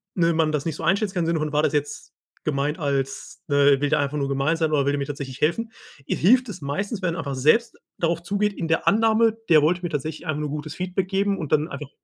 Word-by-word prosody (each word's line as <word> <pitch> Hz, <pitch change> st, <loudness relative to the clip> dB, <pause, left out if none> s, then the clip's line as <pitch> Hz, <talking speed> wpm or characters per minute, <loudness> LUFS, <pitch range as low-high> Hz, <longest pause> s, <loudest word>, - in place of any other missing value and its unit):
ne, 170 Hz, -2 st, +2 dB
man 160 Hz, -1 st, +1 dB
das 150 Hz, -2 st, -2 dB
nicht 160 Hz, -3 st, -2 dB
so -, -, -8 dB
einschätzen 200 Hz, +1 st, +1 dB
kann, 175 Hz, -2 st, 0 dB
im -, -, -2 dB
Sinne 165 Hz, -1 st, +1 dB
von 150 Hz, -1 st, -3 dB
war 150 Hz, -, +3 dB
das 150 Hz, -, +1 dB
jetzt 145 Hz, 0 st, -3 dB, 0.3 s
gemeint 145 Hz, +2 st, -1 dB
als 135 Hz, -3 st, -3 dB
ne, 140 Hz, -1 st, +4 dB
will 145 Hz, -, +1 dB
der -, -, +2 dB
einfach 145 Hz, +1 st, -1 dB
nur 140 Hz, -1 st, -1 dB
gemein 140 Hz, +4 st, +1 dB
sein 160 Hz, -1 st, 0 dB
oder 140 Hz, -2 st, +2 dB
will 140 Hz, -, +1 dB
der 145 Hz, -, 0 dB
mir 140 Hz, -, -2 dB
tatsächlich 140 Hz, -1 st, -7 dB
helfen 220 Hz, +9 st, 0 dB, 0.4 s
i -, -, +1 dB
hilft 250 Hz, +7 st, +4 dB
es 185 Hz, -5 st, -8 dB
meistens, 200 Hz, +9 st, -3 dB
wenn 185 Hz, -, 0 dB
man -, -, -5 dB
einfach 140 Hz, -1 st, -3 dB
selbst 155 Hz, -, +3 dB, 0.2 s
darauf 170 Hz, 0 st, 0 dB
zugeht, 205 Hz, +2 st, 0 dB
in 170 Hz, -, -4 dB
der 165 Hz, -, 0 dB
Annahme, 225 Hz, +1 st, +3 dB
der 155 Hz, -2 st, +7 dB
wollte 175 Hz, +4 st, +1 dB
mir 175 Hz, -, -2 dB
tatsächlich 155 Hz, +3 st, -4 dB
einfach 155 Hz, -1 st, -1 dB
nur 150 Hz, -, -3 dB
gutes 150 Hz, +1 st, -5 dB
Feedback 185 Hz, +1 st, -2 dB
geben 195 Hz, 0 st, +1 dB
und 155 Hz, -5 st, -6 dB
dann 155 Hz, 0 st, +2 dB
einfach 150 Hz, -5 st, -7 dB
155 Hz, 265 wpm, -23 LUFS, 145-185 Hz, 0.4 s, der